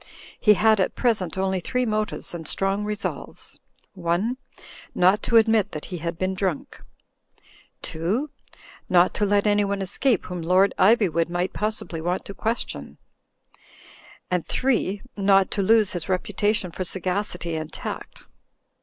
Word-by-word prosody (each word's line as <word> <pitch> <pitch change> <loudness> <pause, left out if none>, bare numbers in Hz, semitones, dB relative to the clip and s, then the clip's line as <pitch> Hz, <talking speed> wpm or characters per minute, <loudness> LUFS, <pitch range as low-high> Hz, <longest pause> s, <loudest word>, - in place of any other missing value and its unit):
He 210 -2 +5
had 220 +1 +4
at 190 - 0
present 210 -8 0
only 190 0 0
three 250 +8 -1
motives 215 -3 -2
and 165 -3 -6
strong 195 +4 0
resolves: 210 0 -5 0.4
(i) 175 +5 0 0.6
not 185 +4 +4
to 235 - +3
admit 220 -3 +3
that 150 - -5
he 175 - -3
had 170 +1 -4
been 185 +2 -1
drunk; 190 -5 -3 1.0
(2) 205 - -2 0.6
not 180 0 +4
to 210 - 0
let 205 +1 +2
anyone 205 -1 +2
escape 200 +4 0
whom 180 -1 -5
Lord 185 +4 +3
Iv)nvood 190 -6 +3
might 175 +1 -1
possibly 210 -6 -3
want 175 +3 -2
to 200 - -7
question; 225 +4 -4 1.3
and 180 -2 +1
(3) 225 -7 0
not 195 -1 +3
to 200 - -1
lose 215 0 +4
his 175 -1 -4
reputation 205 +1 0
for 185 - -4
sagacity 180 -2 -2
and 155 0 -5
tact. - - -7
195 Hz, 140 wpm, -24 LUFS, 180-210 Hz, 1.3 s, He